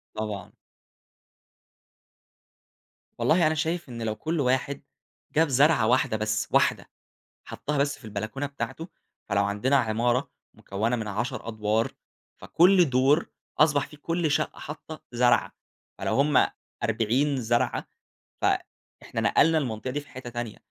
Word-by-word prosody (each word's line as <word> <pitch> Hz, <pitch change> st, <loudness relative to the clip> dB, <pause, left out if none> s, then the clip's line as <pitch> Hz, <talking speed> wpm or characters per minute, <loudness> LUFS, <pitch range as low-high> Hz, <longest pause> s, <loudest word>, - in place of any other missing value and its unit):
طبعًا. 105 Hz, -2 st, -4 dB, 2.7 s
والله 165 Hz, -1 st, +4 dB
أنا 160 Hz, -, +1 dB
شايف 160 Hz, 0 st, -2 dB
إن 120 Hz, -1 st, -7 dB
لو 110 Hz, -1 st, -2 dB
كل 160 Hz, +9 st, -2 dB
واحد 135 Hz, +1 st, 0 dB, 0.5 s
جاب 160 Hz, +1 st, +4 dB
زرعة 140 Hz, -3 st, +4 dB
واحدة 125 Hz, -3 st, +2 dB
بس، 110 Hz, 0 st, -1 dB
واحدة -, -, +2 dB, 0.6 s
حطّها 150 Hz, +1 st, -4 dB
بس 140 Hz, +1 st, 0 dB
في 115 Hz, -, -14 dB
البلكونة 110 Hz, +7 st, -4 dB
بتاعته، 145 Hz, +4 st, -5 dB, 0.4 s
فلو 100 Hz, 0 st, +2 dB
عندنا 105 Hz, +7 st, +1 dB
عمارة 120 Hz, +1 st, +1 dB, 0.2 s
مكوَّنة 110 Hz, +5 st, -2 dB
من 110 Hz, -2 st, -4 dB
10 110 Hz, +3 st, -3 dB
أدوار 110 Hz, 0 st, 0 dB, 0.5 s
فكل 180 Hz, -1 st, +4 dB
دور 135 Hz, +5 st, +3 dB, 0.3 s
أصبح 150 Hz, -2 st, +4 dB
فيه 150 Hz, -, -14 dB
كل 165 Hz, 0 st, -1 dB
شقة -, -, -1 dB
حاطّة 155 Hz, +1 st, -8 dB
زرعة، 120 Hz, 0 st, +3 dB, 0.5 s
فلو -, -, -1 dB
هم 140 Hz, +1 st, +4 dB, 0.4 s
40 120 Hz, +5 st, +1 dB
زرعة، 120 Hz, +1 st, 0 dB, 0.5 s
ف -, -, -5 dB, 0.6 s
إحنا -, -, -4 dB
نقلنا 160 Hz, +1 st, +4 dB
المنطقة 120 Hz, -3 st, -3 dB
دي 145 Hz, +3 st, -2 dB
في 145 Hz, -, -16 dB
حتَّة 125 Hz, -1 st, -8 dB
تانية، 120 Hz, -2 st, -5 dB
130 Hz, 130 wpm, -26 LUFS, 110-150 Hz, 2.7 s, والله